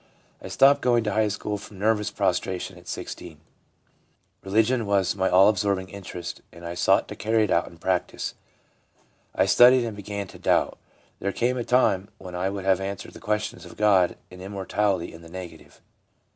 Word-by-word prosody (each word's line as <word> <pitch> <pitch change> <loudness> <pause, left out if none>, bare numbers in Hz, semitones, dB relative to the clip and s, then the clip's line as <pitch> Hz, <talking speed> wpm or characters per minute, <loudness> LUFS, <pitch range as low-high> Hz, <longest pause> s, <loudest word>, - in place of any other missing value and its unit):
I - - -8
stopped 140 +1 +5
going 120 -2 +3
to 105 - -1
high 110 0 +2
school 105 0 -3
from 100 0 -12
nervous 105 +1 +1
prostration 95 -1 -1
at - - -16
16. - - -7 1.0
Religion 110 +4 +1
was 100 -2 +2
my 95 -1 +1
all 95 +2 +6
absorbing 100 -2 +1
interest, 90 -3 -7
and 85 0 -12
I 85 - -4
sought 85 - +2
to - - -6
carry 110 +2 +1
it 105 - -1
out 85 - +2
in 85 - -13
practice. 90 +1 -2 1.0
I - - +3
studied 125 0 +6
and 110 -3 -5
began 100 0 -5
to - - -13
doubt. - - +1 0.4
There 100 - -1
came 120 +5 0
a 120 - -1
time 100 -6 +2
when 90 -2 -10
I 90 +2 -1
would 100 -1 -5
have 95 -1 +3
answered 100 0 -5
the - - -11
questions 105 -5 -2
of 90 - -12
God 100 -4 +3
and 90 0 -11
immortality 95 -1 -1
in 80 - -12
the 85 - -13
negative.' 90 -2 -10
100 Hz, 185 wpm, -25 LUFS, 95-105 Hz, 1.0 s, all